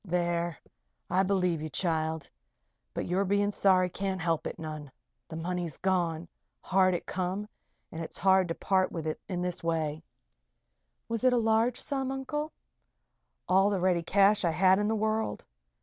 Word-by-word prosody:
"There! 175 -2 -1 0.5
I 185 +2 +4
believe 180 -4 +1
you 155 - -3
be, - - -9
child. 160 -1 -1 0.6
But - - -3
your 185 +3 +1
being 200 +1 +1
sorry 185 -2 +3
can't 190 0 -2
help 165 -2 0
it - - -6
none. 155 -3 -7 0.4
The - - -8
money's 175 -1 -3
gone 175 -3 0 0.3
hard 185 -1 +3
it - - -4
come 190 +3 -3 0.4
and 165 +1 -5
it's - - -3
hard 190 -1 +4
to 165 - -3
part 190 -1 +1
with 165 -2 -5 0.2
in 180 -2 -2
this 180 -1 -3
way." 160 -2 -1 1.1
"Was 230 +1 -3
it 255 -1 +5
a - - +3
large 225 +1 +2
sum, 270 -2 -2
Uncle?" 295 +3 -3 1.0
"All 190 +2 +4
the 200 -2 0
ready 180 -1 +2
cash 200 +4 +3
I 170 - +3
had 185 +3 +4
in 205 - +1
the 220 - +1
world. 220 +1 -1
185 Hz, 165 wpm, -29 LUFS, 170-200 Hz, 1.1 s, it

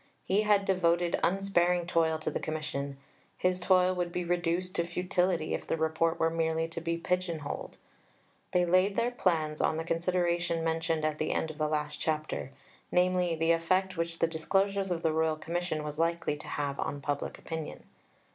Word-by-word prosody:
He 195 +3 +3
had 205 -2 +3
devoted 175 -2 +2
unsparing 180 -2 +2
toil 165 -2 +2
to 155 - -3
the - - -2
Commission; 140 -3 -4 0.4
his 180 0 +1
toil 185 0 +4
would 175 -1 -2
be 180 - -2
reduced 175 +1 0
to 170 0 -1
futility 180 -1 0
if - - -4
the - - 0
Report 160 +1 +1
were 165 0 +2
merely 165 0 0
to 165 0 -5
be 170 0 -1
pigeon 175 -2 -1
holed. 145 - -6 0.7
They 180 0 +3
laid 185 +3 +3
their 240 +1 +1
plans 160 -9 0
on 160 - +2
the 160 - -2
consideration 170 0 0
mentioned 165 -1 0
at 155 -1 -1
the 155 - 0
end 160 - -1
of 155 - -14
the 155 - +2
last 150 -1 -2
chapter 155 -4 -2 0.4
namely, 180 -1 +2
the 165 +1 +2
effect 185 +3 +1
which 165 0 -2
the - - +3
disclosures 195 +4 0
of 170 -2 -2
the 160 - +2
Royal 160 0 +2
Commission 165 0 -2
was 150 0 -5
likely 165 -2 +1
to 150 - -11
have 140 -1 -3
on 145 - -2
public 145 0 -3
opinion. 160 -1 -6
170 Hz, 185 wpm, -30 LUFS, 160-180 Hz, 0.7 s, toil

